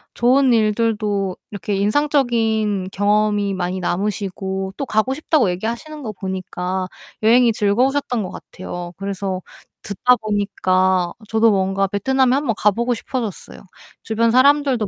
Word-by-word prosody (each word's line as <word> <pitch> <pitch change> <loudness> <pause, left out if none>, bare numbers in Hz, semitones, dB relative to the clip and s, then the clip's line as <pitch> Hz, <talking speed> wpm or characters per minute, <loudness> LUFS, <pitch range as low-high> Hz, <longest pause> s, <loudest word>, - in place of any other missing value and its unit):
좋은 255 +2 +4
일들도 210 -3 0
이렇게 200 0 -3
인상적인 220 -4 +1
경험이 205 0 +1
많이 185 0 -2
남으시고 190 0 -3
또 275 - -3
가고 220 +4 +1
싶다고 295 - +1
얘기하시는 235 - -5
거 215 - -4
보니까 185 -1 -4 0.4
여행이 235 +1 +5
즐거우셨던 245 +3 +1
것 185 - -6
같아요. 175 -1 -8
그래서 195 -1 -3 0.4
듣다 250 +5 +2
보니까 185 -4 0 0.2
저도 225 0 +4
뭔가 195 0 +1
베트남에 255 +6 +1
한번 270 -7 0
가보고 235 +4 +1
싶어졌어요. 225 -5 -5 0.4
주변 225 +1 +1
사람들도 265 -3 +3
210 Hz, 325 characters per minute, -20 LUFS, 190-240 Hz, 0.4 s, 여행이